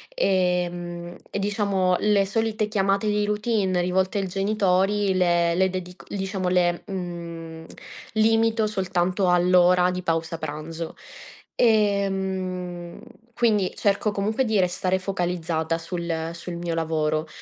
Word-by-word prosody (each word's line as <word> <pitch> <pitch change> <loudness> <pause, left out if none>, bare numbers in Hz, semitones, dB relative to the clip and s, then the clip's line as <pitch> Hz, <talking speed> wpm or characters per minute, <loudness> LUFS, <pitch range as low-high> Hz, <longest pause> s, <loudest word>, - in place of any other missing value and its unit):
Ehm, 175 - -1
e - - -4
diciamo, 200 -3 +1
le 205 -2 +3
solite 215 +1 -1
chiamate 195 0 +1
di 210 0 +1
routine 210 -3 0
rivolte 185 +2 0
al 195 - -2
genitori 195 0 +1
le 175 -2 +2
le 190 +1 +3
dedic 180 0 -7
diciamo 190 -1 -3
le, 175 -1 +2
mhmm, 170 -4 -6 0.5
limito 225 0 +3
soltanto 185 -2 0
all'ora 180 0 +4
di 180 0 -3
pausa 165 -1 -1
pranzo. 160 +2 -6 0.6
Ehm, 190 -5 0 0.4
quindi 210 -6 +2
cerco 205 +1 +1
comunque 215 +6 0
di 220 -3 +1
restare 185 +1 +1
focalizzata 175 -3 -1
sul 165 -1 -3
sul 170 0 -7
mio 170 -1 -3
lavoro, 155 -1 0
185 Hz, 115 wpm, -24 LUFS, 175-200 Hz, 0.6 s, all'ora